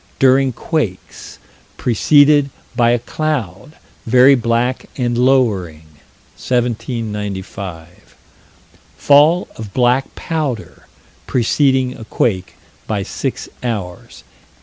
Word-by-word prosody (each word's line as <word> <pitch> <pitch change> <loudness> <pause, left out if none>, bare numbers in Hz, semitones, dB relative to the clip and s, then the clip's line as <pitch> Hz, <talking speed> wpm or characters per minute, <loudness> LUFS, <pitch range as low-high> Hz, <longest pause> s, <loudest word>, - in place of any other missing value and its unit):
during 135 0 +4
quakes 115 - -4 0.4
preceded 145 +4 +4 0.3
by 120 -1 +3
a 120 - +3
cloud, 125 - -4 0.3
very 130 +4 +6
black 120 0 0
and 120 -2 -1
lowering," 110 -11 +1 0.5
1795 105 -7 -3 1.1
fall 150 +5 +4
of 105 -3 -9
black 125 +1 +1
powder, 150 -9 -4 0.4
preceding 130 +1 +1
a 110 - -10
quake, 95 -6 -1 0.3
by 105 -3 -2
six - - -4
hours, 100 -8 -5
1837. - - -32
120 Hz, 90 wpm, -17 LUFS, 105-135 Hz, 1.1 s, very